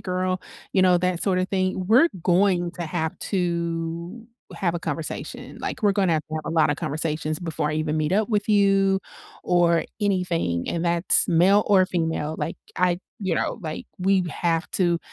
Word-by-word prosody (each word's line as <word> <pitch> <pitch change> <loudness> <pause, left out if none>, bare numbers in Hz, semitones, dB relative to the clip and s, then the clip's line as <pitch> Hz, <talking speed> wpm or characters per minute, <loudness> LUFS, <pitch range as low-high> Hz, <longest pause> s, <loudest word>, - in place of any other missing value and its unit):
girl," 185 0 -2 0.3
you 190 - +3
know, 180 -1 +5
that 180 -1 0
sorta 185 -2 +1
thing, 185 -1 -1
we're 255 - +6
going 180 -1 +2
to 175 - -6
have 160 -1 -3
to 170 +2 -2 0.3
have 175 -4 -1
a - - -1
conversation, 160 -1 -5
like, - - -5
we're 205 -1 +4
gonna 190 -4 +2
have 155 - 0
to 155 - -5
have 155 - -5
a - - -2
lotta 155 -2 +3
conversations 155 +1 -2
before 160 -3 -2
I - - -2
even 155 0 -1
meet 155 +3 0
up 215 +3 +2
with 205 0 0
you 195 -2 +3 0.4
or 175 -2 +3 0.2
anything, 180 - 0
and 170 +1 -2
that's 170 +1 +4
male 185 +5 +5
or 190 -3 +5
female, 160 -3 -2
like, 165 - -3 0.2
I 180 -1 +2 0.3
you 175 -3 0
know, - - -1
like, 155 -1 -5
we 190 0 +2
have 165 +1 -1
to 175 -3 +2
175 Hz, 180 wpm, -24 LUFS, 165-190 Hz, 0.4 s, we're